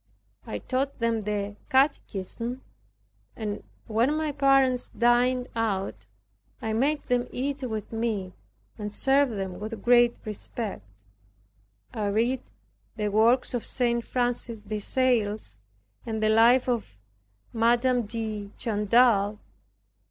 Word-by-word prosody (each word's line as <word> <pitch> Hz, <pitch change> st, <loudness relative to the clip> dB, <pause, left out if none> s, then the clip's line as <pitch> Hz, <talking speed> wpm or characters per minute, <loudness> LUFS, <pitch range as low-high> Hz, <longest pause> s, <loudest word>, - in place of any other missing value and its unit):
I 105 Hz, -, -3 dB
taught 270 Hz, -, -2 dB
them 230 Hz, -2 st, 0 dB
the 205 Hz, 0 st, -3 dB
catechism 250 Hz, -3 st, 0 dB, 0.7 s
and 210 Hz, -2 st, -4 dB, 0.2 s
when 235 Hz, +7 st, +1 dB
my 310 Hz, -1 st, -1 dB
parents 270 Hz, -3 st, +3 dB
dined 245 Hz, +1 st, +2 dB
out 195 Hz, -, -2 dB, 0.5 s
I 220 Hz, -, -3 dB
made 285 Hz, +6 st, +1 dB
them 245 Hz, 0 st, 0 dB
eat 275 Hz, +2 st, -2 dB
with 220 Hz, -5 st, -4 dB
me 220 Hz, -5 st, -2 dB, 0.5 s
and 210 Hz, 0 st, -4 dB
served 270 Hz, +3 st, +3 dB
them 190 Hz, -3 st, -4 dB
with 215 Hz, -1 st, -6 dB
great 240 Hz, 0 st, +5 dB
respect. 210 Hz, -, -5 dB, 1.1 s
I 210 Hz, -1 st, -2 dB
read 235 Hz, +5 st, +1 dB, 0.5 s
the 210 Hz, -2 st, -1 dB
works 230 Hz, +6 st, +3 dB
of 245 Hz, -, -1 dB
St. 235 Hz, -2 st, 0 dB
Francis 240 Hz, -3 st, -2 dB
de 210 Hz, +1 st, -4 dB
Sales 215 Hz, -, 0 dB, 0.4 s
and 220 Hz, -2 st, -3 dB
the 215 Hz, -, +3 dB
life 235 Hz, +4 st, +5 dB
of 230 Hz, -, -2 dB, 0.6 s
Madam 240 Hz, +1 st, +2 dB
de 215 Hz, -2 st, -4 dB
Chantal. 210 Hz, -1 st, +3 dB
230 Hz, 115 wpm, -27 LUFS, 210-250 Hz, 1.1 s, great